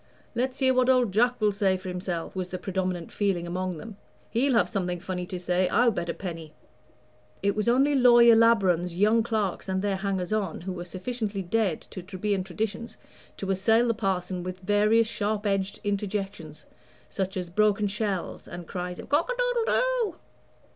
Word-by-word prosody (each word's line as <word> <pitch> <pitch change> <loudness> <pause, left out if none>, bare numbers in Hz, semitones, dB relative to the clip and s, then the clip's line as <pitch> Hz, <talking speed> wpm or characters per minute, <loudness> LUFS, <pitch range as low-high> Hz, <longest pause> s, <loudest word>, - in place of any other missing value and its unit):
"Let's 255 +2 -1
hear 260 -1 +3
what 255 0 +3
old 250 -5 +4
Jack 245 +4 +2
will 210 -1 +3
say 195 -2 +1
for 185 +1 -10
himself," 180 -2 -4
was 185 -1 -3
the 185 - -4
predominant 185 -3 -3
feeling 195 -4 0
among 180 0 -3
them; 215 +4 -9 0.3
"he'll 260 +4 +2
have - - +4
something 180 -4 -2
funny 180 -1 -4
to 185 -2 -5
say, 180 +1 +1
I'll 240 0 +4
bet 175 -4 -3
a - - 0
penny." 165 -4 -7 0.9
It 200 0 +2
was 210 0 -1
only 270 +5 +4
Lawyer 240 -3 +7
Labron's 190 -7 +3
young 215 +5 +4
clerks 215 -4 -2
and 190 +1 -1
their 200 -2 0
hangers 190 -1 -2
on 200 -7 -2
who 185 +2 -4
were 175 -1 -6
sufficiently 200 +2 -4
dead 190 -2 0
to 185 - -6
Trebian 190 +1 -2
traditions 220 +4 -4 0.4
to 195 -1 -2
assail 225 +5 +3
the - - +3
parson 190 -4 -2
with 185 +1 -6
various 210 +3 +3
sharp 210 -1 -2
edged 195 -1 0
interjections, 195 -7 -4 0.4
such 190 +9 -3
as 180 -2 -4
broken 210 +1 +2
shells, 200 -2 -3
and 175 0 -8
cries 180 0 -5
of - - -9
"Cock 310 - +1
a - - -3
doodle - - +1
doo." - - +1
195 Hz, 180 wpm, -27 LUFS, 180-225 Hz, 0.9 s, Lawyer